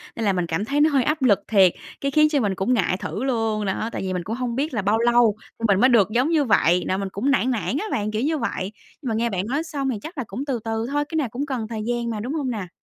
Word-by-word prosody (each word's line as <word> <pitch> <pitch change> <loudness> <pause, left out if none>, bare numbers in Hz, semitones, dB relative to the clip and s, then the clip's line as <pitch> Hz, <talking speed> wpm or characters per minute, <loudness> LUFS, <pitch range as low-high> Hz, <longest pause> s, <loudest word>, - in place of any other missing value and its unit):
Nên 225 - -2
là 200 - +3
mình 180 -2 0
cảm 170 +6 -1
thấy 285 +4 +1
nó 310 - +5
hơi 275 -4 +2
áp 305 -1 0
lực 215 -7 +4
thiệt, 190 -5 +5 0.3
cái 275 - -1
khiến 305 +1 +5
cho 290 -3 +1
mình 200 -5 0
cũng 195 +7 +1
ngại 185 -5 +1
thử 210 +4 -4
luôn, 225 -5 0
đó. 215 +4 -2
Tại - - -4
vì 185 -1 -2
mình 180 -1 -2
cũng 220 +5 -4
hông 245 -2 -3
biết 280 +1 -1
là 215 - 0
bao 210 +3 +2
lâu 235 -2 +4 0.2
thì - - -10
mình 200 -1 +3
mới 255 - +5
được 215 -5 +4
giống 250 +7 +2
như 315 -3 +3
vậy, 180 - +3
nà 185 - 0
mình 195 -1 -3
cũng 255 +10 0
nản 260 -1 +2
nản 245 +4 -1
á 425 - -2
bạn, 210 0 -1
kiểu 215 +2 -1
như 310 +3 +1
vậy. 200 -5 -3 0.3
Nhưng 255 - -3
mà 220 - 0
nghe 235 +1 +1
bạn 190 -1 -2
nói 285 +6 -1
xong 280 -4 -3
thì 245 - -1
chắc 325 0 -9
là 260 - -1
cũng 250 +9 -5
từ 260 -5 -2
từ 225 0 -2
thôi, 290 0 +1
cái 320 - -5
nào 285 -7 0
cũng 265 +6 -3
cần 250 -6 -3
thời 220 -2 -4
gian 240 -1 -1
mà, 215 -2 -3
đúng 250 +7 -4
hông 285 -5 -2
nà? 205 -6 -4
235 Hz, 320 wpm, -23 LUFS, 205-275 Hz, 0.3 s, nó